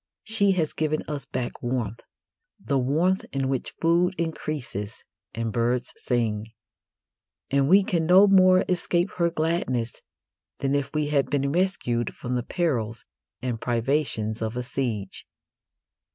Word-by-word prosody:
She 205 Hz, -3 st, +3 dB
has 160 Hz, -5 st, -1 dB
given 155 Hz, 0 st, -1 dB
us 145 Hz, -2 st, -4 dB
back 125 Hz, -1 st, -4 dB
warmth 120 Hz, -3 st, -2 dB, 0.6 s
the 135 Hz, +7 st, 0 dB
warmth 165 Hz, +9 st, +1 dB
in 135 Hz, -1 st, -1 dB
which 135 Hz, -2 st, -3 dB
food 175 Hz, +3 st, +2 dB
increases 150 Hz, -, -4 dB, 0.3 s
and 115 Hz, -1 st, -2 dB
birds 120 Hz, +1 st, 0 dB
sing; 110 Hz, -3 st, -1 dB, 1.0 s
and 140 Hz, 0 st, +2 dB
we 195 Hz, +3 st, +7 dB
can 170 Hz, -4 st, 0 dB
no 185 Hz, +3 st, +8 dB
more 185 Hz, -2 st, +5 dB
escape 175 Hz, 0 st, 0 dB
her 170 Hz, -1 st, +3 dB
gladness 155 Hz, -8 st, -1 dB, 0.6 s
than 135 Hz, 0 st, -1 dB
if 140 Hz, -1 st, -1 dB
we 150 Hz, -1 st, 0 dB
had 140 Hz, -2 st, +1 dB
been 140 Hz, -1 st, 0 dB
rescued 145 Hz, -, 0 dB
from 125 Hz, -, -4 dB
the 125 Hz, -, 0 dB
perils 120 Hz, -, -2 dB, 0.4 s
and 120 Hz, -3 st, -2 dB
privations 115 Hz, -3 st, -1 dB
of 110 Hz, +2 st, -3 dB
a 125 Hz, -, -2 dB
siege. 115 Hz, -7 st, -4 dB
140 Hz, 135 wpm, -25 LUFS, 120-170 Hz, 1.0 s, no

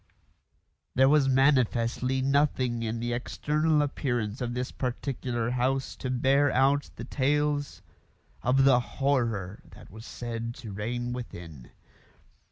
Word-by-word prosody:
There 130 Hz, +1 st, +5 dB
was 140 Hz, -1 st, +4 dB
manifestly 130 Hz, -1 st, +2 dB
nothing 135 Hz, -4 st, +1 dB
in 115 Hz, 0 st, -2 dB
the 120 Hz, +1 st, -2 dB
external 150 Hz, +5 st, +1 dB
appearance 120 Hz, -5 st, -2 dB
of 120 Hz, -1 st, -2 dB
this 125 Hz, +1 st, -3 dB
particular 125 Hz, -2 st, -3 dB
house 130 Hz, +2 st, -1 dB
to 130 Hz, -, -4 dB
bear 135 Hz, +3 st, +3 dB
out 140 Hz, +2 st, +2 dB
the 115 Hz, -, -7 dB
tales 145 Hz, -2 st, 0 dB, 0.6 s
of 130 Hz, +2 st, +3 dB
the 135 Hz, -2 st, +6 dB
horror 120 Hz, -8 st, -1 dB
that -, -, -15 dB
was 110 Hz, +3 st, -11 dB
said 115 Hz, -1 st, -5 dB
to 120 Hz, -4 st, -9 dB
reign 120 Hz, +4 st, -3 dB
within. 85 Hz, -, -8 dB
125 Hz, 125 wpm, -28 LUFS, 115-135 Hz, 0.6 s, the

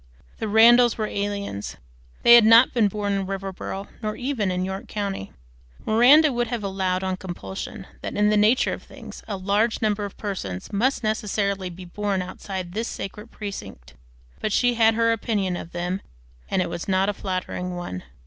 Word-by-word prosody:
The 220 Hz, -, -2 dB
Randalls 235 Hz, +3 st, +6 dB
were 215 Hz, -, -1 dB
aliens. 200 Hz, -, -4 dB, 0.5 s
They 235 Hz, -, +8 dB
had 235 Hz, -1 st, +9 dB
not 230 Hz, +3 st, +7 dB
been 230 Hz, -4 st, +3 dB
born 205 Hz, 0 st, -2 dB
in 195 Hz, -1 st, -1 dB
Riverboro 195 Hz, 0 st, -5 dB
nor 215 Hz, -1 st, -2 dB
even 250 Hz, -6 st, -1 dB
in 180 Hz, 0 st, -1 dB
York 190 Hz, +1 st, -5 dB
County. 200 Hz, -, -4 dB, 0.5 s
Miranda 265 Hz, +7 st, +6 dB
would 240 Hz, 0 st, 0 dB
have 230 Hz, -2 st, -3 dB
allowed, 190 Hz, -1 st, -1 dB
on 190 Hz, -1 st, -1 dB
compulsion, 175 Hz, -, -7 dB, 0.2 s
that -, -, -5 dB
in 210 Hz, 0 st, +3 dB
the -, -, +3 dB
nature 215 Hz, +4 st, +3 dB
of -, -, -6 dB
things -, -, -11 dB
a 205 Hz, -3 st, -3 dB
large 205 Hz, +4 st, +1 dB
number 210 Hz, -1 st, 0 dB
of 200 Hz, -, -7 dB
persons 140 Hz, -, -5 dB
must 250 Hz, +6 st, +1 dB
necessarily 200 Hz, -3 st, -1 dB
be 180 Hz, +1 st, -10 dB
born 195 Hz, +1 st, -2 dB
outside 185 Hz, -1 st, -6 dB
this 225 Hz, +3 st, -2 dB
sacred 210 Hz, +3 st, -7 dB
precinct; 100 Hz, -, -8 dB, 0.5 s
but 215 Hz, -, -2 dB
she 245 Hz, +3 st, +3 dB
had 225 Hz, -1 st, +4 dB
her 230 Hz, 0 st, +3 dB
opinion 205 Hz, -5 st, -1 dB
of 170 Hz, -, -7 dB
them, 175 Hz, +2 st, -3 dB, 0.5 s
and 185 Hz, -, +1 dB
it -, -, -5 dB
was 170 Hz, -, -5 dB
not 190 Hz, 0 st, +2 dB
a 205 Hz, -, 0 dB
flattering 185 Hz, -2 st, -4 dB
one. 175 Hz, -, -5 dB
200 Hz, 180 wpm, -24 LUFS, 185-220 Hz, 0.5 s, had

